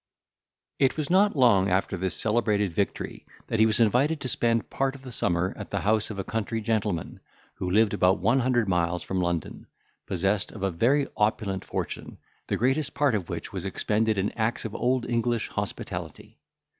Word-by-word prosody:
It 135 Hz, +2 st, +3 dB
was 155 Hz, 0 st, -2 dB
not 200 Hz, +1 st, +4 dB
long 115 Hz, -8 st, +4 dB
after 95 Hz, +1 st, +1 dB
this 95 Hz, 0 st, -1 dB
celebrated 105 Hz, -4 st, +1 dB
victory, 100 Hz, +3 st, -3 dB, 0.2 s
that 115 Hz, -, -2 dB
he 110 Hz, -, +6 dB
was 110 Hz, 0 st, +1 dB
invited 125 Hz, +8 st, +3 dB
to -, -, -3 dB
spend 115 Hz, -2 st, +1 dB
part 135 Hz, 0 st, 0 dB
of 135 Hz, -, -13 dB
the 130 Hz, -, -8 dB
summer 90 Hz, -4 st, 0 dB
at -, -, -8 dB
the -, -, -2 dB
house 110 Hz, +1 st, +1 dB
of 105 Hz, -, -6 dB
a 95 Hz, -, -2 dB
country 115 Hz, +2 st, -2 dB
gentleman, 105 Hz, -6 st, -2 dB, 0.4 s
who 90 Hz, -, -3 dB
lived 105 Hz, +2 st, +3 dB
about 90 Hz, +2 st, +3 dB
one 120 Hz, +4 st, +2 dB
hundred 120 Hz, -3 st, +1 dB
miles 90 Hz, -1 st, 0 dB
from 95 Hz, -1 st, -2 dB
London, 85 Hz, -3 st, -3 dB, 0.4 s
possessed 95 Hz, +2 st, 0 dB
of 105 Hz, -, -7 dB
a 95 Hz, -, +1 dB
very 130 Hz, -, +2 dB
opulent 105 Hz, -3 st, 0 dB
fortune, -, -, -5 dB, 0.3 s
the -, -, 0 dB
greatest 135 Hz, +4 st, 0 dB
part 140 Hz, -1 st, +2 dB
of 95 Hz, -6 st, -2 dB
which -, -, -5 dB
was -, -, -4 dB
expended 110 Hz, 0 st, 0 dB
in 95 Hz, +1 st, 0 dB
acts 115 Hz, +1 st, -1 dB
of 110 Hz, -, -4 dB
old 125 Hz, 0 st, 0 dB
English 120 Hz, -1 st, 0 dB
hospitality. -, -, -6 dB
110 Hz, 185 wpm, -26 LUFS, 95-120 Hz, 0.4 s, he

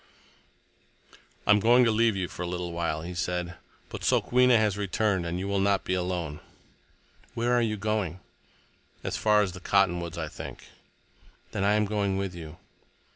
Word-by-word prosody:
"I -, -, +4 dB
am 105 Hz, -, +6 dB
going 120 Hz, +4 st, +5 dB
to 115 Hz, -, +3 dB
leave 110 Hz, 0 st, +3 dB
you 95 Hz, -2 st, -2 dB
for -, -, -9 dB
a 90 Hz, -, -2 dB
little 90 Hz, 0 st, -4 dB
while," 85 Hz, -2 st, -2 dB
he 90 Hz, +2 st, -6 dB
said. 90 Hz, +1 st, -2 dB, 0.4 s
"But -, -, -7 dB
Sokwenna 125 Hz, -1 st, +4 dB
has 105 Hz, -3 st, +2 dB
returned, 100 Hz, -2 st, 0 dB
and 85 Hz, +1 st, -2 dB
you 95 Hz, +2 st, -3 dB
will 100 Hz, 0 st, 0 dB
not 100 Hz, 0 st, +2 dB
be 95 Hz, -, -2 dB
alone." 90 Hz, -5 st, -2 dB, 1.0 s
"Where 120 Hz, +1 st, +1 dB
are 120 Hz, -, +4 dB
you 110 Hz, -2 st, 0 dB
going?" 105 Hz, -4 st, -2 dB, 0.8 s
"As -, -, -2 dB
far 105 Hz, -1 st, +3 dB
as 95 Hz, -, -2 dB
the 90 Hz, -, -9 dB
cottonwoods, 90 Hz, -3 st, +1 dB
I 80 Hz, -2 st, -3 dB
think." -, -, -9 dB, 0.9 s
"Then 100 Hz, -, -2 dB
I 100 Hz, +1 st, +3 dB
am 105 Hz, 0 st, +2 dB
going 100 Hz, -2 st, -1 dB
with 95 Hz, -2 st, -3 dB
you." 80 Hz, -2 st, -9 dB
95 Hz, 180 wpm, -27 LUFS, 90-105 Hz, 1.0 s, am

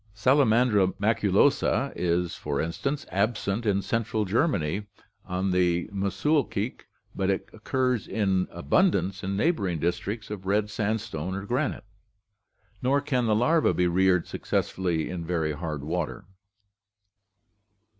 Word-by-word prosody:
Salamandra 110 Hz, -5 st, +3 dB
maculosa 110 Hz, +7 st, +2 dB
is, 90 Hz, 0 st, 0 dB
for -, -, -3 dB
in 80 Hz, -, -1 dB
stance, 140 Hz, -, -3 dB
absent 105 Hz, +1 st, 0 dB
in 100 Hz, -1 st, +2 dB
Central 110 Hz, -2 st, -1 dB
Germany 105 Hz, -, 0 dB, 0.4 s
on 95 Hz, +1 st, -1 dB
the 90 Hz, -1 st, +2 dB
Muschelkalk, 110 Hz, +3 st, -1 dB, 0.3 s
but 95 Hz, -1 st, 0 dB
it 95 Hz, -, -1 dB
occurs 125 Hz, +1 st, -1 dB
in 95 Hz, -4 st, +1 dB
abundance 95 Hz, -, +1 dB
in 95 Hz, +1 st, -2 dB
neighboring 100 Hz, -, +1 dB
districts 100 Hz, +7 st, -3 dB
of 95 Hz, -3 st, -6 dB
red 105 Hz, +1 st, +1 dB
sandstone 100 Hz, -6 st, -2 dB
or 100 Hz, 0 st, -5 dB
granite; 125 Hz, +1 st, -1 dB, 1.0 s
nor 135 Hz, +3 st, +2 dB
can 130 Hz, -4 st, 0 dB
the 110 Hz, -, +3 dB
larvae 155 Hz, +9 st, +3 dB
be 90 Hz, -, +1 dB
reared 90 Hz, 0 st, +3 dB
successfully 85 Hz, -4 st, -1 dB
in 90 Hz, -2 st, -4 dB
very 80 Hz, -2 st, -1 dB
'hard* 75 Hz, -2 st, -4 dB
water" 85 Hz, +1 st, -3 dB
(Gadow). 95 Hz, -, -27 dB
100 Hz, 125 wpm, -27 LUFS, 90-115 Hz, 1.0 s, Salamandra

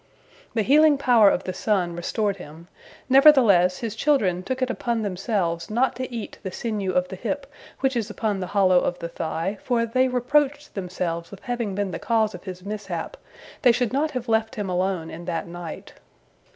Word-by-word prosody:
The 220 Hz, -, +2 dB
healing 295 Hz, +4 st, +5 dB
power 240 Hz, -6 st, +5 dB
of 185 Hz, -, 0 dB
the 185 Hz, -, -4 dB
sun 185 Hz, -3 st, 0 dB
restored 200 Hz, +3 st, -1 dB
him, 165 Hz, 0 st, -12 dB, 0.4 s
nevertheless 245 Hz, -, +6 dB
his 225 Hz, -3 st, -4 dB
children 220 Hz, -9 st, +1 dB
took 260 Hz, +7 st, -2 dB
it 255 Hz, -, 0 dB
upon 235 Hz, -3 st, -2 dB
themselves 180 Hz, -4 st, -2 dB
not 245 Hz, +4 st, +1 dB
to 255 Hz, 0 st, -4 dB
eat 230 Hz, -3 st, -6 dB
the 190 Hz, -, -5 dB
sinew 205 Hz, -2 st, -2 dB
of 180 Hz, 0 st, +1 dB
the -, -, -6 dB
hip 275 Hz, +8 st, -3 dB, 0.4 s
which 265 Hz, -1 st, +1 dB
is 225 Hz, -3 st, -1 dB
upon 210 Hz, -3 st, -2 dB
the 185 Hz, -, -3 dB
hollow 185 Hz, -2 st, +4 dB
of 175 Hz, -, -1 dB
the 170 Hz, -, -6 dB
thigh, 165 Hz, +4 st, -3 dB
for 235 Hz, -2 st, +1 dB
they 255 Hz, +3 st, +2 dB
reproached 285 Hz, +4 st, 0 dB
themselves 175 Hz, -3 st, -3 dB
with 200 Hz, -, -11 dB
having 235 Hz, -5 st, -3 dB
been 200 Hz, -1 st, -1 dB
the -, -, -5 dB
cause 220 Hz, -2 st, +1 dB
of 180 Hz, -, -10 dB
his 185 Hz, -1 st, -8 dB
mishap, 210 Hz, -, -5 dB, 0.5 s
they 250 Hz, -, +6 dB
should 245 Hz, 0 st, 0 dB
not 295 Hz, +3 st, +1 dB
have 250 Hz, -4 st, -5 dB
left 220 Hz, 0 st, +1 dB
him 205 Hz, -3 st, -3 dB
alone 180 Hz, -2 st, -1 dB
in 170 Hz, +1 st, -8 dB
that 165 Hz, -, -2 dB
night. 170 Hz, -1 st, -8 dB
210 Hz, 190 wpm, -24 LUFS, 180-245 Hz, 0.5 s, nevertheless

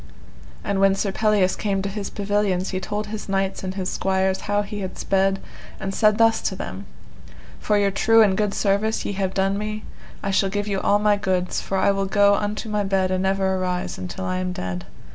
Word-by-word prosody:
And 200 Hz, -1 st, -1 dB
when 195 Hz, 0 st, +5 dB
Sir 195 Hz, 0 st, -1 dB
Pelleas 205 Hz, -2 st, +2 dB
came 195 Hz, -2 st, -1 dB
to -, -, -2 dB
his 200 Hz, 0 st, -4 dB
pavilions 200 Hz, -2 st, 0 dB
he 185 Hz, -, -1 dB
told 210 Hz, +3 st, -3 dB
his 210 Hz, -1 st, -7 dB
knights 195 Hz, 0 st, -1 dB
and 185 Hz, 0 st, -4 dB
his 190 Hz, -2 st, -2 dB
squires 190 Hz, 0 st, 0 dB
how 205 Hz, 0 st, +2 dB
he 205 Hz, 0 st, -6 dB
had 190 Hz, -1 st, -5 dB
sped, 195 Hz, 0 st, +1 dB, 0.4 s
and 195 Hz, 0 st, -3 dB
said 215 Hz, 0 st, +3 dB
thus 225 Hz, 0 st, +4 dB
to -, -, -1 dB
them, -, -, -7 dB, 0.7 s
For 210 Hz, -, +1 dB
your 200 Hz, -1 st, +2 dB
true 225 Hz, +3 st, +5 dB
and 195 Hz, -3 st, +3 dB
good 210 Hz, -1 st, 0 dB
service 210 Hz, +2 st, +1 dB
ye -, -, -1 dB
have 190 Hz, -1 st, -2 dB
done 195 Hz, +1 st, +1 dB
me 215 Hz, 0 st, -4 dB, 0.4 s
I 195 Hz, -, -1 dB
shall 195 Hz, 0 st, +2 dB
give 205 Hz, +1 st, -2 dB
you 195 Hz, -2 st, -1 dB
all 205 Hz, -, +3 dB
my 210 Hz, 0 st, +3 dB
goods, 185 Hz, -2 st, -1 dB
for 195 Hz, -, -2 dB
I 200 Hz, -, +3 dB
will 195 Hz, 0 st, -1 dB
go 200 Hz, 0 st, +4 dB
unto 210 Hz, +2 st, -2 dB
my 210 Hz, -1 st, 0 dB
bed 190 Hz, -1 st, +1 dB
and 185 Hz, 0 st, 0 dB
never 190 Hz, 0 st, +1 dB
arise 180 Hz, -1 st, -2 dB
until 190 Hz, +1 st, -5 dB
I 185 Hz, 0 st, -1 dB
am 185 Hz, 0 st, -2 dB
dead. 90 Hz, -, -5 dB
195 Hz, 220 wpm, -23 LUFS, 190-205 Hz, 0.7 s, when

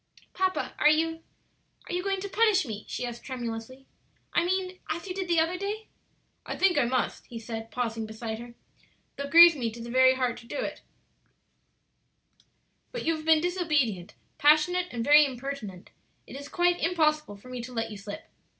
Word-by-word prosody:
"Papa, 375 Hz, 0 st, -1 dB
are 300 Hz, -, +6 dB
you 325 Hz, +1 st, +1 dB, 0.7 s
are -, -, -5 dB
you 355 Hz, -, 0 dB
going 390 Hz, 0 st, -1 dB
to 400 Hz, -, -4 dB
punish 415 Hz, -3 st, +3 dB
me?" 215 Hz, -3 st, -6 dB
she 250 Hz, -, -4 dB
asked, 240 Hz, -1 st, -7 dB
tremulously. 245 Hz, 0 st, -6 dB, 0.5 s
"I -, -, +3 dB
mean 370 Hz, +1 st, -2 dB
as 330 Hz, +1 st, -3 dB
you 365 Hz, -, -3 dB
did 380 Hz, -1 st, -4 dB
the 340 Hz, -1 st, +3 dB
other 340 Hz, +3 st, 0 dB
day?" 420 Hz, +2 st, -4 dB, 0.5 s
"I -, -, -5 dB
think 380 Hz, -2 st, +3 dB
I -, -, +3 dB
must," 250 Hz, +1 st, -2 dB
he 235 Hz, -, -8 dB
said, 225 Hz, 0 st, -6 dB
pausing 225 Hz, -1 st, -3 dB
beside 220 Hz, 0 st, -6 dB
her, 240 Hz, 0 st, -10 dB, 0.6 s
"though 280 Hz, -, -4 dB
it -, -, -8 dB
grieves 335 Hz, +1 st, +9 dB
me 240 Hz, -5 st, -2 dB
to 230 Hz, +2 st, -10 dB
the 235 Hz, 0 st, -7 dB
very 260 Hz, +1 st, +5 dB
heart 250 Hz, -2 st, -1 dB
to 235 Hz, -, -13 dB
do -, -, -5 dB
it; -, -, -4 dB, 2.1 s
but -, -, -5 dB
you 330 Hz, 0 st, +2 dB
have 310 Hz, 0 st, -8 dB
been 320 Hz, -1 st, +5 dB
disobedient, 300 Hz, -, 0 dB, 0.2 s
passionate, 310 Hz, +5 st, +4 dB
and 235 Hz, -2 st, -4 dB
very 295 Hz, +1 st, +8 dB
impertinent; 250 Hz, -8 st, -6 dB, 0.3 s
it -, -, -11 dB
is 285 Hz, +1 st, -8 dB
quite 350 Hz, 0 st, +2 dB
impossible 305 Hz, -, +1 dB
for 230 Hz, +6 st, -15 dB
me 250 Hz, -1 st, -5 dB
to 245 Hz, +2 st, -8 dB
let 225 Hz, -2 st, -3 dB
you 210 Hz, -, -7 dB
slip. 205 Hz, +1 st, -8 dB
280 Hz, 190 wpm, -28 LUFS, 235-350 Hz, 2.1 s, grieves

